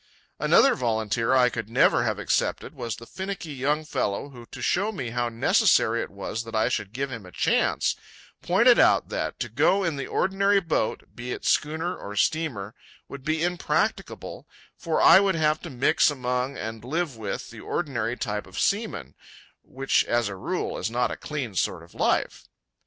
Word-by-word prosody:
Another - - +5
volunteer 115 +1 0
I 125 -1 +5
could 110 -2 -5
never 115 - +4
have - - -1
accepted - - -1
was 115 -2 -4
the 115 - -11
finicky 190 -1 -6
young 145 +4 -1
fellow 120 -3 -2
who, 120 -4 -13
to - - -10
show 205 +4 +1
me 130 - -5
how 120 0 -1
necessary 115 0 +3
it - - -5
was 115 - -5
that 115 0 -8
I 110 +2 +2
should 105 -5 -2
give 135 +3 -3
him 115 -4 -6
a 90 - -13
chance, - - +1 0.5
pointed 230 +8 +5
out - - +4
that - - -3
"to - - -1
go 195 +1 +2
in 165 -5 -1
the 140 - -4
ordinary 195 +1 +2
boat, 165 - -1
be 120 +1 -6
it - - -8
schooner 160 +4 0
or 100 +1 -8
steamer, 115 -5 -1 0.3
would 140 -1 -9
be 155 +2 0
impracticable, 175 0 -2 0.3
for - - -1
I - - +8
would 195 -2 +2
have 155 -1 +1
to 170 - -7
mix 130 +2 +3
among 125 -1 -2
and 110 0 -6
live 155 +2 -2
with 110 -3 -5
the - - -11
ordinary 125 -7 -2
type 105 -3 -3
of - - -7
seamen, 200 - -1 0.5
which 135 +1 0
as 120 -2 +1
a 100 - -6
rule 95 - -3
is - - -2
not 120 +1 0
a - - -3
clean 140 -8 -5
sort 90 -2 -1
of 85 - -17
life." - - 0
130 Hz, 185 wpm, -25 LUFS, 115-160 Hz, 0.5 s, I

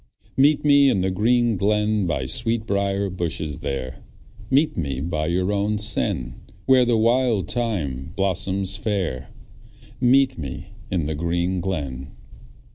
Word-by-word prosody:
Meet 145 +2 +3
me 140 -1 +6
in 95 - +1
the 95 +1 0
green 115 +3 +2
glen, 105 0 +1
By 65 -6 -1
sweetbriar 100 - -1
bushes 80 -5 -2
there; 65 -2 -5 0.5
Meet 145 +4 +2
me 70 -6 -3
by 75 0 -2
your 90 +4 0
own 105 +1 0
sen, 65 - -1 0.2
Where 130 -1 +5
the 120 -1 +2
wild 115 -2 +2
thyme 80 - -2
blossoms 95 0 0
fair. 95 - -3 0.7
Meet 130 +1 +3
me 70 -4 -7 0.2
in 90 -5 -1
the 80 - -2
green 85 +3 -1
glen. 70 -7 -4
95 Hz, 130 wpm, -23 LUFS, 80-115 Hz, 0.7 s, me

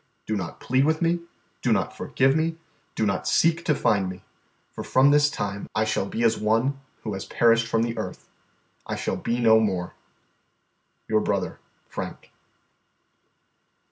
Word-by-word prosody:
Do 110 - -1
not 90 -5 -5
plead 130 +2 +2
with 160 +1 +2
me, 170 0 +1 0.4
do - - +1
not - - +1
forgive 135 +1 +1
me, 160 +1 0 0.4
do 110 - +1
not 100 - -1
seek 165 +1 +3
to 150 - +3
find 100 -7 +1
me, 95 0 -9 0.5
for - - -7
from 135 +2 +4
this 145 0 +5
time 100 -6 -4
I 110 - +3
shall 110 -2 -1
be 115 - -2
as 115 - +3
one 115 +6 +1 0.2
who 105 - -3
has 95 - -5
perished 115 0 +3
from 115 0 +1
the 115 0 -2
earth; - - -6 0.6
I - - -2
shall - - -2
be 120 +1 -2
no 110 -2 +6
more. 95 -5 -1 1.1
"Your - - +2
brother, - - -2 0.3
FRANK." - - -7
115 Hz, 165 wpm, -25 LUFS, 105-140 Hz, 1.1 s, no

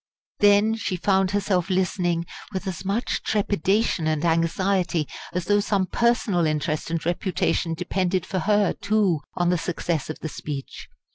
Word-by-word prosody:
Then 205 +2 +5
she 220 -4 -2
found 190 +1 +2
herself 190 -2 0
listening 180 -2 0 0.3
with 190 +1 -3
as 190 -3 -4
much 200 +5 -1
trepidation 200 -3 +1
and 155 +1 0
anxiety 170 0 +1 0.2
as 180 -1 -2
though 205 +1 +3
some 200 -2 +1
personal 210 -6 +1
interest 155 +1 -1
and 165 -1 -2
reputation 175 -1 0
depended 185 +1 -1
for 185 0 -2
her, 205 +2 +2
too, 200 -5 +1 0.2
on 175 0 +1
the 180 - +1
success 165 -3 -2
of 155 - -4
the 160 - -4
speech. 145 -2 -7
185 Hz, 150 wpm, -24 LUFS, 165-200 Hz, 0.3 s, Then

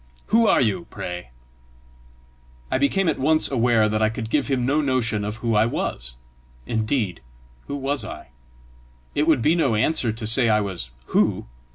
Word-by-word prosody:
Who 230 0 +5
are - - +4
you, 100 -8 0
pray?" 90 -5 -6 1.4
I - - +1
became 180 +7 +1
at - - 0
once 155 +3 +2
aware 120 -4 +3
that 110 0 -1
I 110 - +3
could 110 0 -6
give 145 -2 +1
him 130 -3 0
no 145 +4 +2
notion 125 -6 0
of 105 +1 -3
who 115 +1 -2
I 105 +1 +3
was. - - -4 0.5
Indeed, 110 - -1 0.5
who 140 - -4
was 140 0 0
I? - - -9 0.8
It 150 +2 0
would 150 -8 +3
be 155 - +4
no 140 -10 +1
answer 120 +1 +1
to 110 +1 -6
say 115 +2 +4
I 105 -1 +4
was 95 - -4 0.2
who! - - +2
115 Hz, 175 wpm, -23 LUFS, 105-140 Hz, 1.4 s, Who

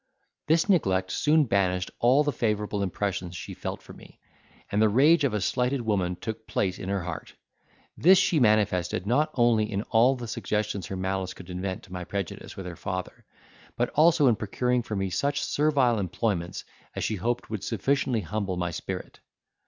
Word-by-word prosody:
This 160 +4 +3
neglect 95 - +2
soon 155 +1 +3
banished 90 -6 0
all 130 +5 +4
the 145 - 0
favourable 105 -4 -1
impressions 95 -2 -2
she - - -7
felt - - -6
for - - -12
me, - - -16 0.5
and 105 - +2
the 110 - +5
rage 145 +9 +5
of 130 -6 +1
a - - +1
slighted 125 +6 0
woman 95 -6 0
took 110 +3 -6
place 95 -2 -1
in 95 - -5
her 100 -2 -1
heart; 85 -2 -7 0.6
this 185 +3 +6
she 180 -3 +3
manifested 105 -6 +2
not 145 +8 +2
only 115 -3 +3
in 100 0 -1
all 120 +4 +5
the 120 -2 -7
suggestions 105 -4 -2
her 95 - -5
malice 95 0 -2
could 90 0 -10
invent 95 +1 -4
to 95 - -13
my 90 -1 -4
prejudice 95 0 -5
with 95 - -6
her 90 -1 -6
father, 90 +1 -5 0.5
but 120 - +1
also 160 0 +4
in 120 -4 +5
procuring 125 +4 0
for 110 -2 -5
me 95 -1 -2
such 140 +7 0
servile 140 -6 +2
employments 90 -2 -2 0.3
as - - -3
she 110 - -1
hoped 115 +4 -2
would 105 -3 -4
sufficiently 125 +2 0
humble 100 0 -3
my 90 -1 -1
spirit. - - -6
105 Hz, 185 wpm, -27 LUFS, 95-125 Hz, 0.6 s, this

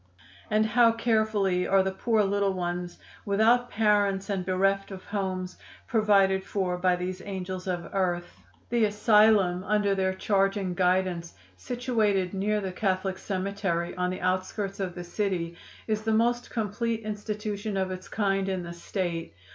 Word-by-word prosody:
And 215 +1 +3
how 230 +2 +5
carefully 215 -5 +1
are 195 0 +4
the 190 - -1
poor 220 +3 +1
little 200 0 +1
ones, 175 -1 -3 0.3
without 225 +5 +3
parents 205 -2 +2
and 190 -2 -1
bereft 195 +2 +1
of 190 -2 -8
homes, 185 -3 -3 0.3
provided 195 -4 +3
for 185 -3 -1
by 180 0 +3
these 180 +1 -4
angels 185 -1 -5
of 175 -2 -2
earth! 175 -3 -1 0.3
"The 235 -2 +3
asylum 210 -3 +4
under 205 0 +2
their 190 -1 0
charge 195 0 +1
and 185 -3 -2
guidance, 180 -2 0 0.2
situated 220 -7 0
near 210 +2 0
the 190 -1 -3
Catholic 190 0 -1
Cemetery, 190 -3 -2
on 180 0 0
the 185 - -4
outskirts 185 +2 -1
of 185 -3 -3
the 175 - -6
city, 175 -2 -2 0.3
is 215 -1 -1
the 220 0 0
most 240 +2 +1
complete 225 +1 -2
institution 210 -1 -4
of 190 -1 -1
its 185 +1 -7
kind 195 -2 0
in 185 -2 -2
the 170 0 -7
State. 170 - -4
195 Hz, 155 wpm, -27 LUFS, 185-210 Hz, 0.3 s, how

